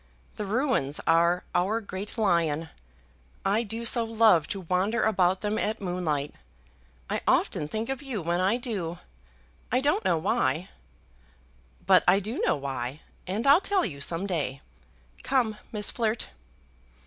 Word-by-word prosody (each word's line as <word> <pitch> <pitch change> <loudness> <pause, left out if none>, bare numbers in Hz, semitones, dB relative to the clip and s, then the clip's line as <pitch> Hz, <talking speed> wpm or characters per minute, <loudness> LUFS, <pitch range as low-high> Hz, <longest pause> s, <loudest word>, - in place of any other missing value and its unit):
The 210 - -4
ruins 220 - +1
are 170 +2 +3
our 200 +6 +1
great 200 0 -4
lion. 165 -7 +1 0.8
I 200 +3 +2
do 230 +1 -4
so 230 +1 +3
love 220 -8 +4
to 195 - -4
wander 185 +6 0
about 185 -3 +2
them 210 +1 -1
at 215 +1 -1
moonlight. 175 -7 -2 0.7
I - - -2
often 150 - +2
think 220 +7 -3
of 270 +1 -3
you 265 -7 -4
when 170 +2 0
I 195 +6 +2
do; 195 -9 -4 0.7
I 250 - +3
don't 285 -4 +1
know 180 -3 +2
why. 155 +2 0 1.2
But - - +6
I 185 +3 +6
do 215 +5 -4
know - - +2
why, 135 0 -5 0.3
and 205 +7 -2
I'll 285 +6 +7
tell 395 -1 +1
you 140 -9 -6
some 165 +6 -1
day. 145 -8 -2 0.6
Come, 235 -6 0
Miss 210 -1 0
Flirt!" 225 -1 -1
195 Hz, 150 wpm, -27 LUFS, 170-225 Hz, 1.2 s, I'll